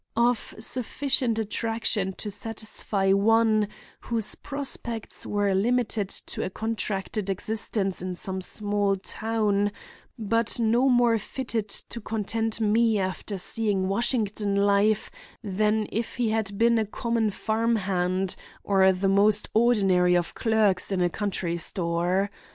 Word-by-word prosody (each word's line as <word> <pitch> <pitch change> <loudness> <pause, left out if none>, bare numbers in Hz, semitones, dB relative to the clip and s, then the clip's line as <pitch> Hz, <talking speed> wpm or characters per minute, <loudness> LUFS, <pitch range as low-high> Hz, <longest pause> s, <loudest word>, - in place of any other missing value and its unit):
—of 240 -1 +1
sufficient 250 +1 0
attraction 220 -2 -1
to 205 +2 -6
satisfy 205 -2 -1
one 215 +1 +3 0.3
whose 230 -3 -1
prospects 260 -5 -5
were 205 -1 +1
limited 220 0 +1
to - - -1
a - - -2
contracted 210 -1 -3
existence 200 -1 -1
in 185 0 -4
some 190 +1 -4
small 205 0 0
town, 205 0 -1 0.5
but 230 +1 0
no 235 +4 +3
more 240 -2 +4
fitted 225 -2 -4
to 235 +3 -4
content 225 +1 -2
me 220 +1 +3
after 190 +1 -3
seeing 200 -1 +1
Washington 210 -1 0
life 200 +1 +2 0.3
than 210 +2 +1
if 225 +2 -3
he 235 -3 0
had 210 -3 -1
been 235 +1 +4
a 220 - 0
common 230 0 -1
farm 225 +3 0
hand 185 -2 -1 0.3
or 190 -1 +4
the 190 +1 -1
most 205 +2 +3
ordinary 195 -6 +4
of 175 -1 -2
clerks 215 -5 +2
in 190 - 0
a 175 -1 +2
country 185 -4 -2
store. 175 +3 0
210 Hz, 130 wpm, -26 LUFS, 195-225 Hz, 0.5 s, more